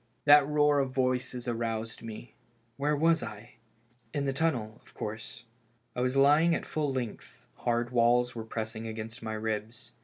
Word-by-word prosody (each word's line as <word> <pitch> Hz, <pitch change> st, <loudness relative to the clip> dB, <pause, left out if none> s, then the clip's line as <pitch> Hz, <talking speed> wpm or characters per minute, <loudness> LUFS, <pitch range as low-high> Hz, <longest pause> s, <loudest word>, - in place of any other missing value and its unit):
That 145 Hz, -1 st, +8 dB
roar 150 Hz, -1 st, +3 dB
of 135 Hz, -1 st, +1 dB
voices 130 Hz, -1 st, -1 dB
aroused 115 Hz, -1 st, -3 dB
me. 115 Hz, +1 st, -9 dB, 0.4 s
Where 145 Hz, +3 st, +1 dB
was 165 Hz, +2 st, +3 dB
I? 110 Hz, +2 st, -8 dB, 0.6 s
In 140 Hz, -1 st, 0 dB
the 135 Hz, -, 0 dB
tunnel, 125 Hz, -8 st, -1 dB
of -, -, -21 dB
course. 110 Hz, +2 st, -6 dB, 0.5 s
I 125 Hz, -, -1 dB
was 130 Hz, +2 st, +1 dB
lying 150 Hz, +5 st, +5 dB
at -, -, -4 dB
full 150 Hz, -3 st, -1 dB
length, 125 Hz, -4 st, -6 dB
hard 120 Hz, 0 st, 0 dB
walls 120 Hz, 0 st, +3 dB
were 115 Hz, -, -5 dB
pressing 110 Hz, 0 st, -5 dB
against 110 Hz, +1 st, -6 dB
my 110 Hz, -1 st, -4 dB
ribs. 110 Hz, +1 st, -4 dB
120 Hz, 160 wpm, -30 LUFS, 110-140 Hz, 0.6 s, That